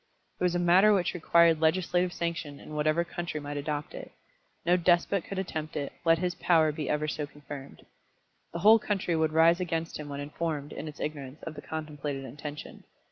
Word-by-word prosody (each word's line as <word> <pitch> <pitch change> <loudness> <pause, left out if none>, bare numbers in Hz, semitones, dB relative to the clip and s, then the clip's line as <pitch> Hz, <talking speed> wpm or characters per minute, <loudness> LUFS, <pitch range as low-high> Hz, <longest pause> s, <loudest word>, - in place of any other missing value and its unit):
It - - -2
was 180 -1 +2
a - - +3
matter 185 +4 +5
which 180 -3 0
required 170 -2 +4
legislative 175 +2 +2
sanction 165 -4 -4
in - - -11
whatever 155 +2 +2
country 170 -2 -5
might 145 0 -5
adopt 145 0 -3
it. - - -8 0.5
No 175 +1 +5
despot 175 +1 +2
could 195 - -6
attempt 155 -5 -4
it, 140 -2 -3
let 165 -1 +5
his 180 +1 -1
power 160 -3 +3
be 150 -1 -4
ever 150 0 0
so 150 -1 -3
confirmed. 145 -1 -10 0.7
The - - -4
whole 220 +1 +9
country 195 -5 -1
would 160 -1 +1
rise 165 +2 +5
against 165 -3 -3
him 150 -1 -7
when 140 0 -5
informed, 150 0 -4
in 155 - -6
its 150 -2 -9
ignorance, 145 -2 -5
of 165 - -5
the 145 - -9
contemplated 150 -3 -5
intention. 150 +1 -8
160 Hz, 190 wpm, -29 LUFS, 150-175 Hz, 0.7 s, whole